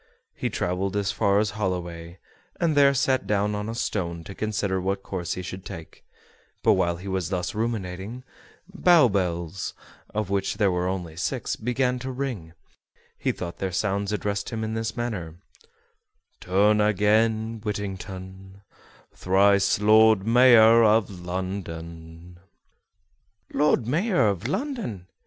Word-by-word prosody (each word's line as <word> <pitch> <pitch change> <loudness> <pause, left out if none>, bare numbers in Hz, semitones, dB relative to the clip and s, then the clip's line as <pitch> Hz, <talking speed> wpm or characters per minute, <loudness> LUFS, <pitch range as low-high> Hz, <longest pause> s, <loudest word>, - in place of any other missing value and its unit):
He - - -3
traveled 90 +2 -2
as 100 -1 0
far 100 0 +2
as 105 0 +1
Holloway, 85 -4 -4 0.4
and 165 -3 +1
there 140 -1 +6
sat 130 0 +1
down 105 0 +1
on 105 +1 -3
a 115 - -4
stone 85 -7 -3
to 100 - -9
consider 100 -3 -2
what 95 +1 -2
course 90 -2 -4
he 90 - -5
should 95 +1 -7
take; 85 -5 -10 0.6
but - - +5
while 85 0 +1
he 95 +3 -9
was 95 -3 -2
thus 90 -2 -2
ruminating, 110 +1 -4 0.4
Bow 175 -6 +5
bells, 90 -2 -2 0.4
of 105 -2 -3
which 100 0 0
there 100 -2 +3
were 90 0 -1
only 90 -4 -4
six, 115 +8 -2
began 125 +2 -1
to 130 +1 -5
ring; 125 -9 -4
and 80 - -18 0.6
he - - -1
thought 85 -1 -7
their 95 -1 -2
sounds 100 +1 -1
addressed 100 -1 -2
him 110 -2 -4
in 110 0 -3
this 110 0 -3
manner: 100 -10 -4 1.0
"Turn 105 +3 +3
again, 110 +2 +2
Whittington, 95 -1 -6 0.5
Thrice 100 +1 +3
Lord 110 -1 +5
Mayor 115 -1 +7
of 110 -1 +3
London." 85 -2 -6 1.1
"Lord 145 -5 +2
Mayor 165 - +2
of 100 +2 -3
London!" 195 - -3
100 Hz, 140 wpm, -25 LUFS, 90-110 Hz, 1.1 s, Mayor